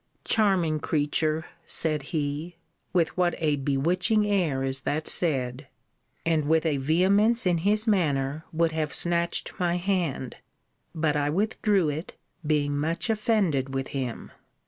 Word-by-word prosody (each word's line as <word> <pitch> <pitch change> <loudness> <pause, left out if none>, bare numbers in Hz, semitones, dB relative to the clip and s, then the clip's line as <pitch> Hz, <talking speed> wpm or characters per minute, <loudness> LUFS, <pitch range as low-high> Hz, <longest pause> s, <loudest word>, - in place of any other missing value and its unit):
Charming 185 -8 +2
creature! 155 +1 0 0.2
said 155 -2 0
he, 155 +2 -3 0.4
with 170 -3 +1
what 180 -1 +1
a 150 -3 +1
bewitching 175 +10 +1
air 175 -10 +1
is 135 0 -1
that 155 +3 -2
said! 135 -4 0 0.6
And 160 -3 +1
with 160 +2 +2
a 150 -3 +1
vehemence 195 - +2
in 175 -2 +2
his 210 +5 +1
manner 155 - +1
would 165 0 +1
have 155 -2 -2
snatched 170 0 0
my 175 -1 +1
hand. 175 -9 -2 0.6
But 155 -2 +1
I 145 0 +1
withdrew 200 0 +1
it, 155 +4 -5 0.3
being 150 -2 +1
much 165 +8 -1
offended 190 - 0
with 135 0 -2
him. 130 -4 -5
160 Hz, 135 wpm, -26 LUFS, 145-180 Hz, 0.6 s, Charming